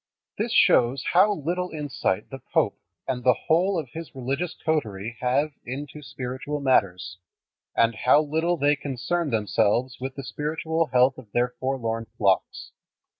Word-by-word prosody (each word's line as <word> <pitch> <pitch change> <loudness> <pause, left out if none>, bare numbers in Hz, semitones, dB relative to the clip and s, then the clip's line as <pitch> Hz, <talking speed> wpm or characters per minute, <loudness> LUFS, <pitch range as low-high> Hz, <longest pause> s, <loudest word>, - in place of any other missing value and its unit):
This - - -1
shows 125 +2 +4
how 190 +4 +6
little 180 +1 -2
insight 145 -11 -2
the 135 - -6
pope - - +2 0.3
and 125 -2 -2
the 125 -1 +5
whole 180 +4 +3
of 150 -6 -4
his 165 -2 -8
religious 135 +7 -2
coterie 115 -8 -1
have 135 +5 +1
into 145 +4 -6
spiritual 130 +2 -5
matters, 100 -9 +1 0.6
and 115 0 +3
how 145 +7 +4
little 160 +4 0
they 145 0 +3
concern 145 +4 -2
themselves 115 +2 +1
with 130 0 -4
the 135 - -6
spiritual 160 +4 -2
health 130 0 +3
of 110 -5 -15
their 120 +1 +2
forlorn 115 -4 -2
flocks. 95 -3 0
135 Hz, 145 wpm, -25 LUFS, 120-155 Hz, 0.6 s, how